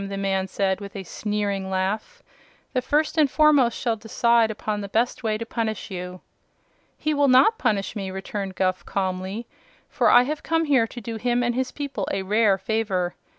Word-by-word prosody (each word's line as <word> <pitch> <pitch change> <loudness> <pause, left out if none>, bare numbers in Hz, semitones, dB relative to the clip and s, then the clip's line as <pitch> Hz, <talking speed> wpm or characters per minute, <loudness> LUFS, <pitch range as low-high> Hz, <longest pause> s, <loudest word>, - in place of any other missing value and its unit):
the 195 - -4
man 195 -1 0
said, 190 0 -1
with 200 -1 -9
a 195 - -5
sneering 200 0 -3
laugh. 205 - -2 0.5
"The 255 - +1
First 305 +4 +1
and 295 -3 +5
Foremost 285 -6 +4
shall 235 -3 0
decide 230 +1 +2
upon 215 -1 -3
the 200 - -6
best 235 +5 0
way 220 -2 0
to 230 - -5
punish 225 -3 -3
you." 180 0 -6 0.8
"He 305 0 -1
will 285 -1 +3
not 270 - +5
punish 200 0 0
me," 195 -2 -4
returned 190 0 -5
Guph, 185 -1 0
calmly, 190 +3 -3 0.4
"for - - +2
I 245 - +7
have 300 +4 -3
come 325 0 0
here 265 -6 +3
to 240 - -9
do 225 0 -5
him 245 +2 0
and 240 0 +1
his 255 +1 -2
people 285 -2 -4
a 195 -1 -1
rare 205 0 +3
favor. 195 -5 -1
220 Hz, 190 wpm, -24 LUFS, 195-250 Hz, 0.8 s, I